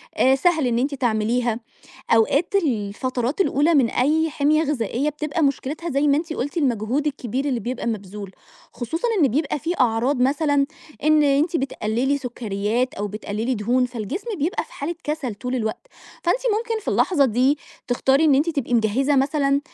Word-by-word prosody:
آآ 265 +1 +4
سهل 315 -1 +2
إن 235 -1 +1
أنتِ 280 +3 -1
تعمليها، 235 -1 0 0.5
أوقات 275 - +3
الفترات 255 - -1
الأولى 320 -2 +3
من 255 -5 +4
أي 315 +5 +2
حمية 300 +2 +2
غذائية 275 -1 -1
بتبقى 300 +2 -3
مشكلتها 295 +4 -1
زي 280 +1 +1
ما 280 - +4
أنتِ 320 +1 -2
قُلتِ 285 +1 -4
المجهود 260 -1 0
الكبير 265 -2 -2
اللي 255 -5 -1
بيبقى 245 +2 -4
مبذول، 205 -2 -5 0.4
خصوصًا 325 - -3
إن 275 - +5
بيبقى 285 +5 -1
فيه 330 +5 -2
أعراض 250 +3 +2
مثلًا 285 +1 +2 0.4
إن 305 0 +5
أنتِ 290 +4 +2
بتقللي 265 0 -1
سكريات 240 -1 -2
أو 205 - -3
بتقللي 215 +4 -3
دهون، 245 +4 +1
فالجسم 245 - -5
بيبقى 315 +6 -1
في - - -21
حالة 310 +5 -4
كسل 295 -7 -3
طول 250 +5 -4
الوقت، 220 - -3 0.4
فأنتِ 350 +8 +2 0.2
ممكن 455 -1 -3
في - - -8
اللحظة 300 -7 +3
دي 260 +4 +2 0.3
تختاري 265 +4 +3
إن 290 -3 +5
أنتِ 295 +5 +2
تبقي 275 -6 -2
مجهزة 245 +6 +2
مثلًا 275 0 +2
270 Hz, 165 wpm, -22 LUFS, 235-300 Hz, 0.5 s, إن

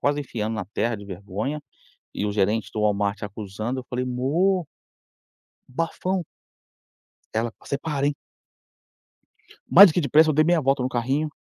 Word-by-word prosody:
quase 145 +1 +1
enfiando 115 -5 -3
na 105 - -3
terra 110 +4 -2
de 100 - -10
vergonha 100 +9 -4 0.5
e - - -2
o 105 - -1
gerente 105 +2 0
do 110 - -2
Walmart 105 0 0
acusando. 110 +5 -4
Eu - - -20
falei: 125 +1 -2
"Mô" 160 +9 +1 1.0
"bafão". 165 +5 -2 1.1
Ela: 115 +1 -1
"Você 140 - -3
para, 145 -2 -1
hein". 145 - +1 1.5
Mais 200 +4 +10
do - - -1
que - - +2
depressa, 155 +2 +4
eu - - 0
dei 155 +2 +4
meia 170 0 +3
volta 135 0 +2
no 125 - 0
carrinho 135 +5 -1
125 Hz, 155 wpm, -24 LUFS, 105-150 Hz, 1.5 s, Mais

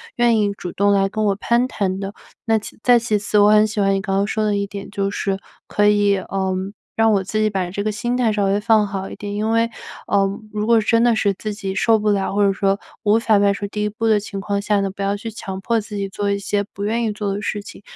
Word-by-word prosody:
愿 240 -2 +3
意 205 -1 +1
主 175 - -6
动 200 +3 +2
来 195 -1 +3
跟 215 +2 -2
我 200 -1 +2
攀 235 +4 +1
谈 195 -6 -2
的。 195 0 -5 0.3
那 225 -1 +3
其 215 - -8
再 245 +1 +5
其 230 -2 0
次， 210 +1 0
我 205 0 +6
很 215 0 +5
喜 215 0 -4
欢 195 -1 +3
你 195 - 0
刚 195 -1 -2
刚 200 - +2
说 215 +1 -1
的 210 -1 +1
一 200 - -1
点， 200 0 -8
就 200 -1 -1
是 195 -1 -1 0.3
可 205 0 +2
以， 205 -1 +4
呃， 190 0 -2 0.4
让 225 0 +4
我 200 -2 +2
自 215 +3 -2
己 215 0 +2
把 190 -3 -2
这 200 +2 -3
个 215 - 0
心 240 +4 -2
态 245 -3 +2
稍 205 -1 0
微 195 +1 +2
放 220 -1 +4
好 195 -1 -5
一 - - -8
点， 205 0 -6
因 210 +2 -1
为， 230 +1 +2 0.4
呃， 200 -1 +3 0.3
如 210 0 -1
果 230 -1 +5
真 230 +2 +2
的 240 -1 +4
是 205 -2 +1
自 210 +2 -5
己 195 -2 -4
受 225 +2 +3
不 210 0 0
了， 195 -1 0
或 205 0 +3
者 195 - +3
说 195 0 0 0.2
无 210 0 +4
法 225 -2 +3
迈 200 0 +4
出 200 +1 -3
第 210 +1 -3
1 210 - 0
步 220 +2 -4
的 215 -1 +4
情 200 -1 -6
况 200 0 -2
下 205 0 +1
呢？ 195 0 0
不 200 - -9
要 200 +1 0
去 225 +2 -6
强 190 -3 -6
迫 225 +3 0
自 210 0 -9
己 200 0 -2
做 200 +1 -3
一 200 - 0
些 200 +1 -1
不 200 - -6
愿 230 +3 0
意 220 - 0
做 205 -1 -3
的 200 - -4
事 205 0 -3
情， - - -11
205 Hz, 300 characters per minute, -20 LUFS, 200-215 Hz, 0.4 s, 我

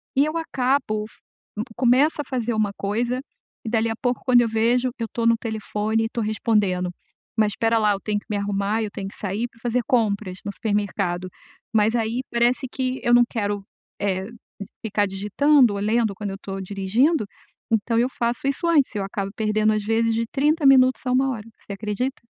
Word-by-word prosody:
e 280 +2 +4
eu 310 +2 -2
acabo, 255 -8 0 0.7
começo 265 +5 +3
a - - -8
fazer 240 -3 -1
uma 215 -2 +1
coisa, 240 +5 -1 0.4
e - - -2
dali 225 0 +1
a 225 - -2
pouco 245 -1 0
quando 245 -2 +6
eu 235 - +2
vejo, 240 +3 +2
eu 230 - -1
estou 230 0 -1
no 230 0 +4
telefone 220 0 -2
e - - +1
estou 230 -1 -3
respondendo, 205 -4 +1 0.5
mas 215 -1 +3
espera 225 0 +1
lá 210 -1 +3
eu 195 - -4
tenho 210 -1 -1
que - - -26
me 205 - -1
arrumar, 200 +2 -1
eu 210 - -3
tenho 195 -1 -5
que - - -14
sair 205 +4 -2
para 230 - -24
fazer 240 +1 0
compras 205 -6 0
no 200 - -2
supermercado, 195 -4 -1 0.4
mas 220 +2 +3
aí 230 +2 0
parece 240 +2 +2
que 260 0 -2
eu 240 - +3
não 240 0 +7
quero, 205 -3 -2 0.4
eh, 190 -1 -1 0.6
ficar 205 -1 +1
digitando 220 +6 +3
ou 200 - -3
lendo 215 -1 +1
quando 205 -1 -4
eu - - -5
estou 195 -1 -6
dirigindo, 205 - +1 0.5
então 225 +1 +2
eu 250 +2 +2
faço 235 +2 -2
isso 275 +5 -1
antes, 290 -8 +3
eu 200 - -1
acabo 195 0 -4
perdendo 215 0 +2
às 215 -1 -1
vezes 225 +1 +1
de 230 - 0
30 300 +2 +1
minutos, 260 -1 +6
a 250 - 0
1h, 255 -4 0 0.2
você 200 - -6
acredita? 215 +6 -3
225 Hz, 195 wpm, -23 LUFS, 205-250 Hz, 0.7 s, não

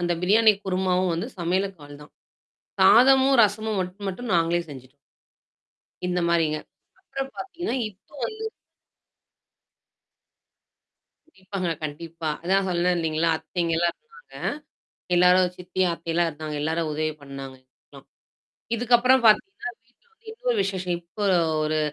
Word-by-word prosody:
அந்த 175 0 0
பிரியாணி 215 +4 +5
குருமாவும் 185 -1 +1
வந்து 170 - -3
சமையலுக்கு 185 +1 -1
ஆல் 145 0 -12
தான். 150 - -16 0.7
சாதமும், 265 +2 +6
ரசமும் 215 +1 0
மட்டும் 185 +3 -6
மட்டும் 225 +4 -5
நாங்களே 170 0 +2
செஞ்சுட்டோம். 135 0 -12 1.1
இந்த 180 0 0
மாரிங்க. 160 -3 +2 0.4
அப்புறம் 270 0 -6
பார்த்தீங்கன்னா, 350 -7 -4
இப்போ 195 +6 -25
வந்து 440 0 -6 2.8
கண்டிப்பாங்க, 190 - -5 0.2
கண்டிப்பா. 160 +1 -5
அதான் 190 +2 +2
சொன்னே 180 0 +1
இல்லைங்களா? 160 0 0
அத்தைங்கலாம் 170 +1 -1
இருந்தாங்க. 465 +1 -20
ஆ. - - +2 0.7
எல்லாரும் 180 +1 +5
சித்திய 185 +1 -1
அத்தையல்லாம் 170 0 0
இருந்தாங்க. 155 0 -7
எல்லாரும் 160 +1 -1
உதவி 155 +1 -1
பண்ணாங்க, 135 -1 -8 0.2
கொஞ்சம். - - -17 0.7
இதுக்கப்புறம் 245 +2 +4
பார்த்தீங்கனா 245 - +2
வீட்ல 245 - -36
வந்து 445 0 -20
இன்னொரு - - -1
விசேஷம். 185 -2 -2
இப்போ 170 +4 -14
ஒரு - - +4 0.3
ஒரு 155 0 0
180 Hz, 120 wpm, -25 LUFS, 165-220 Hz, 2.8 s, சாதமும்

